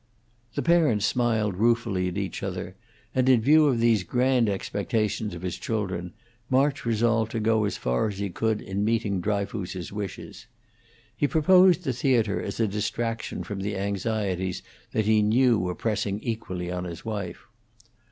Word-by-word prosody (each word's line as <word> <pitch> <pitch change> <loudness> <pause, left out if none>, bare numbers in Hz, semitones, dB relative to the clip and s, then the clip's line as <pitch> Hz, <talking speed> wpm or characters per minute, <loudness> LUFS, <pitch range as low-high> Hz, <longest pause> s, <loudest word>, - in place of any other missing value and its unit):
The - - -1
parents 155 -12 +3
smiled 110 -5 +1
ruefully 115 -4 +1
at 90 +1 -4
each 100 -2 -3
other, 90 -1 -5 0.4
and, 130 0 +2
in 130 -3 +6
view 150 +6 +5
of 125 -5 +2
these 115 -3 +3
grand 125 +2 +2
expectations 105 0 -2
of 85 - -9
his 90 -2 -4
children, 95 -6 -3 0.4
March 135 0 +1
resolved 115 0 +2
to 115 - -1
go 110 0 +2
as 100 - -2
far 60 - 0
as 100 -2 -5
he 100 -1 -3
could 110 +3 -1
in 95 +2 -2
meeting 105 -4 0
Dryfoos's 100 -2 -3
wishes. 105 0 -7 0.7
He 145 +6 +1
proposed 180 +5 +5
the 130 - -1
theatre 115 -5 +1
as - - -5
a 115 - +3
distraction 115 +3 -3
from 100 -2 -5
the 100 0 -3
anxieties 100 -2 -2 0.3
that 110 - 0
he 110 0 +4
knew 115 +2 +3
were 90 0 -2
pressing 105 -2 -1
equally 90 -6 -4
on 90 0 -3
his 85 -2 -8
wife. 100 -6 -5
105 Hz, 160 wpm, -26 LUFS, 95-115 Hz, 0.7 s, in